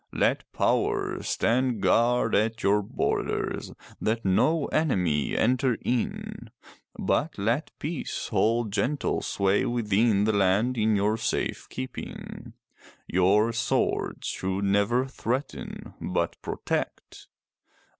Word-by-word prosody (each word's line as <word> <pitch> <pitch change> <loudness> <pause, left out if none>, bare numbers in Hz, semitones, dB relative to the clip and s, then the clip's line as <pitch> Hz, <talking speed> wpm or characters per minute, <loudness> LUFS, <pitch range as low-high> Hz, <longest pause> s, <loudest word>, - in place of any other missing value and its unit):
Let - - 0
Power - - 0
stand 125 -1 +1
guard 120 +4 +3
at 110 +2 +1
your 105 +1 +4
borders, 100 - -2 0.3
that 115 +1 -1
no 145 - +3
enemy 90 - +1
enter 130 -1 +2
in, 120 -1 -2 0.5
but 155 +3 0
let 115 +9 0
Peace 155 0 -4
hold 115 -1 +1
gentle 135 +7 0
sway 100 0 +1
within 110 -2 +2
the 110 +1 +2
land 100 +5 +2
in 110 -2 +2
your 105 +2 +1
safe 110 - -2
keeping. 65 - -7 0.5
Your 100 +5 +3
swords 115 - -1
should 95 +1 -2
never 100 +6 +2
threaten, 130 0 -4
but - - -1
protect. - - -4
110 Hz, 105 wpm, -27 LUFS, 100-125 Hz, 0.5 s, your